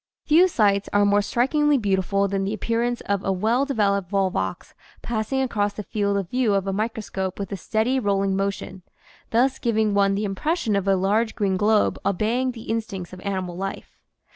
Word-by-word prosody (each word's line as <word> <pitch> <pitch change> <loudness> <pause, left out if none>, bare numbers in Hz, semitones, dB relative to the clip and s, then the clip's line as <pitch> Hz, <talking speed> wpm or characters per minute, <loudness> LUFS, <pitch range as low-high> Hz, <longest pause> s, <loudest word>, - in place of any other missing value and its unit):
Few 335 +4 +5
sights 205 - +1
are 205 0 +4
more 205 0 +4
strikingly 285 +7 +2
beautiful 200 -2 +1
than 195 0 -1
the 200 +3 -2
appearance 235 +2 -1
of 200 -1 -2
a 195 - 0
well 225 +8 +1
developed 200 -8 0
volvox 185 - -1 0.3
passing 240 +4 -1
across 205 -5 -1
the 210 - -6
field 200 -1 -1
of 195 -3 -4
view 245 -5 +2
of 195 -1 0
a 195 - -2
microscope 205 -3 -3
with 200 0 -5
a - - -2
steady 220 +7 0
rolling 195 -3 +1
motion, 195 -1 -3 0.5
thus 255 +4 +2
giving 220 -3 +1
one 200 -1 +3
the 210 +1 -1
impression 225 - -1
of 200 0 -1
a 195 - +4
large 210 +4 +1
green 200 -4 0
globe 210 +2 +2
obeying 230 +7 0
the 225 -2 -10
instincts, 200 -6 -4
of 185 - -9
animal 185 -3 -3
life. 195 +2 -6
205 Hz, 185 wpm, -23 LUFS, 195-230 Hz, 0.5 s, Few